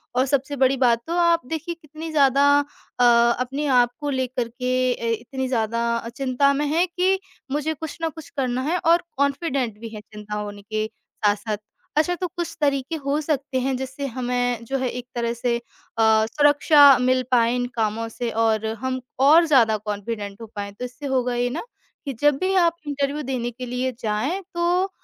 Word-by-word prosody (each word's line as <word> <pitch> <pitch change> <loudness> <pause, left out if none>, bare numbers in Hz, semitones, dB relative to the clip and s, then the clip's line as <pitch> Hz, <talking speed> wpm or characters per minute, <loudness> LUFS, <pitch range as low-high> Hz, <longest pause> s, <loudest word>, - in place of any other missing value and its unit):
और 255 +1 +3
सबसे 280 +1 0
बड़ी 270 0 +3
बात 240 -3 +3
तो 335 - -2
आप 340 -3 +3
देखिए, 325 +4 -4
कितनी 315 0 -9
ज़्यादा 280 -2 +4
अ, 285 -3 -4 0.4
अपने 270 +4 -2 0.2
आप 240 0 0
को 290 - -3
लेकर 255 -3 -1
के 255 +1 0
अ, 235 - -6
इतनी 265 +2 -4
ज़्यादा 230 -1 0
अ, 230 0 -5
चिंता 270 +3 +1
में 290 +2 0
हैं 325 +5 +2
कि 380 +1 +3 0.3
मुझे 300 +2 -1
कुछ 315 +1 -7
ना 325 - 0
कुछ 320 -1 -11
करना 255 -2 0
है 360 - +2
और 340 +1 +4
कॉन्फिडेंट 275 -5 0
भी 230 0 -7
हैं 215 -1 -8
चिंता 210 0 -8
होने 205 -1 -5
के 215 +1 -2
साथ-साथ। 210 -1 -2 0.4
अच्छा, 335 +4 +3
तो 360 +1 -3
कुछ 345 -1 -5
तरीके 280 +2 0
हो 285 0 -1
सकते 280 -3 -1
हैं 265 +1 0
जिससे 265 +2 -5
हमें 245 -1 -1
जो 270 +3 -2
है 255 -1 -1
एक 245 0 -6
तरह 235 -1 -1
से 235 0 -1
अ, - - -10 0.6
सुरक्षा 290 +1 +6
मिल 255 +1 +2
पाए 235 -1 +3
इन 245 0 0
कामों 225 0 -1
से 235 +1 -4
और 220 -1 +1 0.2
हम 260 0 -1 0.2
और 310 +5 +6
ज़्यादा 235 -8 +4
कॉन्फिडेंट 205 0 -5
हो 225 - -6
पाएँ। 200 -1 -4
तो 250 - -6
इससे 250 +4 -9
होगा 255 -2 0
ये 245 0 0
ना, 305 +7 -4 0.4
कि 275 - -3
जब 295 -1 +4
भी 375 +1 0
आप 340 -2 +4
इंटरव्यू 285 +1 -1
देने 250 -3 -3
के 250 +2 -7
लिए 250 +1 -2
जाएँ 230 - -1
तो 350 +2 +1
260 Hz, 190 wpm, -23 LUFS, 235-295 Hz, 0.6 s, सुरक्षा